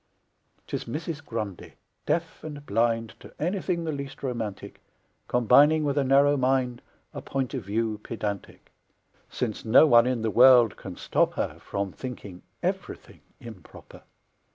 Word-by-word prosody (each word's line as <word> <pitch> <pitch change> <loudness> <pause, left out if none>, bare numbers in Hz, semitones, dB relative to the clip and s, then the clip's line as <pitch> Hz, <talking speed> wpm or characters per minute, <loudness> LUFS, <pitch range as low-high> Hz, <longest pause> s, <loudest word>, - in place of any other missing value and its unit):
'Tis - - -5
Mrs. 150 +4 -5
Grundy, 105 -6 -6 0.3
deaf 165 -1 -2
and 145 -2 -8
blind 115 0 0
To - - -13
anything 180 0 -1
the 160 - -2
least 140 -2 -7
romantic, 115 -6 -5 0.5
Combining 145 +6 +4
with 140 -2 0
a 145 - +2
narrow 140 +2 +4
mind 130 -2 0 0.3
A - - -6
point 135 -1 -3
of 130 -5 -4
view 110 +1 -2
pedantic, 105 -4 -6 0.6
Since 115 -4 -4
no 115 +7 +6
one 120 -4 +6
in 125 -3 -1
the 110 - 0
world 125 -2 +6
can 95 -2 -9
stop - - 0
her - - -3
From 100 -1 -4
thinking 100 -8 -8 0.2
ev'rything - - -4 0.2
improper. 110 -7 -13
125 Hz, 140 wpm, -26 LUFS, 110-145 Hz, 0.6 s, no